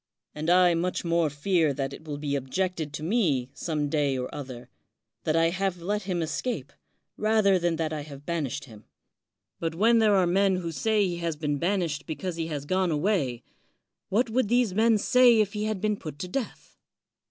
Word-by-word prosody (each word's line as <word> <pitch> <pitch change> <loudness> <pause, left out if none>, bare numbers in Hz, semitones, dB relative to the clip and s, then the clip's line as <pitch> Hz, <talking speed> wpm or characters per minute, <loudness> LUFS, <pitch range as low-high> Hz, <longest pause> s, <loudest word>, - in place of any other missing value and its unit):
And 155 +2 -3
I 180 0 +5
much 175 +2 -1
more 170 -2 +2
fear 155 0 +1
that 135 0 -3
it 155 - -11
will 145 -2 -5
be 145 -1 -2
objected 160 +3 -2
to 150 - -5
me 155 - +1
some 150 -3 -2
day 145 -2 +1
or 125 0 -4
other, 130 -4 -7 0.6
that 155 - +1
I 165 0 +4
have 190 -1 -1
let 205 +5 -2
him 175 -2 0
escape, 150 - -3 0.4
rather 215 -3 +3
than 170 -1 +1
that 160 -1 -2
I 150 - -3
have 145 -1 -11
banished 145 -5 -3
him. 110 -5 -14 0.7
But 165 -1 -2
when 230 +6 +4
there 215 -2 +4
are 190 -2 +4
men 190 +2 +3
who 175 -2 -3
say 215 +5 +1
he 175 -1 -3
has 170 -2 -2
been 150 -2 -2
banished 170 -4 -1
because 175 +2 -4
he 165 -1 -2
has 145 -3 -4
gone 185 +3 +1
away, 150 - 0 0.7
what 235 +6 +2
would 250 -1 +1
these 240 -3 +2
men 220 +2 +4
say 245 +2 +5
if 205 -2 +1
he 210 0 -2
had 215 -2 -2
been 210 +1 0
put 155 -5 -8
to 180 - -5
death? 240 +6 -6
170 Hz, 200 wpm, -27 LUFS, 150-200 Hz, 0.7 s, I